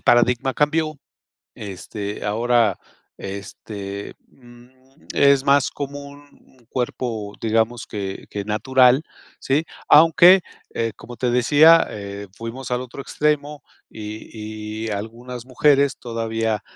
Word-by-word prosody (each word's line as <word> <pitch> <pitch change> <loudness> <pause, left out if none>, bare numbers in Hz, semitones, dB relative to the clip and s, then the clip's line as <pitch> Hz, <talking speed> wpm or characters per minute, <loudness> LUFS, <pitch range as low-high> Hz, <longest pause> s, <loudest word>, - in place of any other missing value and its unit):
paradigma 125 +2 +3
cambió, 155 0 0 0.6
este, 100 +1 -6
ahora, 115 -1 +2 0.4
este, 100 0 -7
mm, 120 -1 -18 0.4
es 140 -1 +4
más 140 -1 +3
como 140 0 -6
un 145 0 -16 0.2
un - - -30
cuerpo, 115 -4 -3
digamos 115 +1 0
que 100 -3 -6
que 100 -1 -4
natural. 125 +5 +3 0.4
Sí, 145 +4 +1 0.2
aunque, 170 +4 +7 0.3
eh, 115 -1 -1
como 120 - -11
te 125 0 0
decía, 150 +7 +6
eh, 100 0 -7
fuimos 120 +3 -7
al 125 0 0
otro 130 +2 -8
extremo 150 0 -1 0.3
y 110 0 -7
y - - -3
algunas 115 +4 -6
mujeres 140 +2 +2
todavía, 115 -2 -2
120 Hz, 115 wpm, -22 LUFS, 110-140 Hz, 0.6 s, aunque